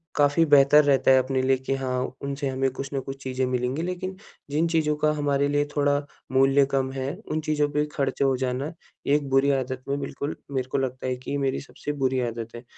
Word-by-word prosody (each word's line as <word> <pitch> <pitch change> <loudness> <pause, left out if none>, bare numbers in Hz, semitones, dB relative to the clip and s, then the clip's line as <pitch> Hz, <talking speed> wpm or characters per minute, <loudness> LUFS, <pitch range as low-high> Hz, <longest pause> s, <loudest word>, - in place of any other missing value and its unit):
काफ़ी 145 +2 +4
बेहतर 145 0 +6
रहता 135 -2 +4
है, 130 - +7
अपने 130 0 0
लिए 130 0 +3
कि 130 +1 -3
हाँ, 130 -1 -2
उनसे 140 0 -2
हमें 135 0 0
कुछ 135 +1 -6
ना 135 - 0
कुछ 135 +1 -7
चीज़ें 130 0 -1
मिलेंगी, 125 +4 -1
लेकिन 180 +1 -4 0.4
जिन 160 +3 +2
चीज़ों 155 -2 +1
का 150 0 +2
हमारे 145 -1 +1
लिए 145 0 +1
थोड़ा 145 0 +3 0.3
मूल्य 135 +1 +4
कम 135 -1 0
है, 135 +1 -3 0.2
उन 155 - 0
चीज़ों 150 -1 +1
पे 150 0 0
खर्च 140 -1 -1
हो 135 -1 +3
जाना, 130 +3 -2 0.4
एक 145 0 +2
बुरी 135 +1 +4
आदत 130 -1 -2
में 140 +1 -1
बिल्कुल 140 +1 -4 0.2
मेरे 130 -2 -1
को - - +1
लगता 130 -1 -2
है 130 - 0
कि 145 - -2
मेरी 135 -1 0
सबसे 145 +1 -6
बुरी 130 0 +2
आदत 115 0 -6
है। 120 - -8
135 Hz, 215 wpm, -25 LUFS, 130-145 Hz, 0.4 s, है